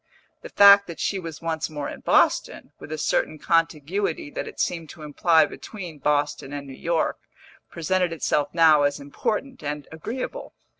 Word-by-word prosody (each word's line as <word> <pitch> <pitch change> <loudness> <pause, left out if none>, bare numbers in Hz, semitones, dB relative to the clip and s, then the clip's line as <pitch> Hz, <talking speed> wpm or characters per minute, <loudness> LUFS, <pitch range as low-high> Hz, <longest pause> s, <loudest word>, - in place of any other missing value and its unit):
The - - -9
fact 200 0 +7
that 170 - -8
she 195 - -1
was 165 -2 -8
once 160 -1 -2
more 150 -2 -5
in - - -7
Boston, - - +1
with - - -11
a 155 - -3
certain 155 +1 0
contiguity 165 +1 -1
that - - -5
it - - -10
seemed 165 -3 -2
to 155 +2 -11
imply 160 +2 +3
between 175 -1 -9
Boston 145 -1 0
and 145 -1 -5
New 135 - -10
York, 165 +4 -1 0.5
presented 180 +1 0
itself 150 -3 0
now 160 -3 +5
as 145 0 +1
important 215 - -3
and 150 -1 -5
agreeable. 240 - -6
160 Hz, 165 wpm, -24 LUFS, 150-180 Hz, 0.5 s, fact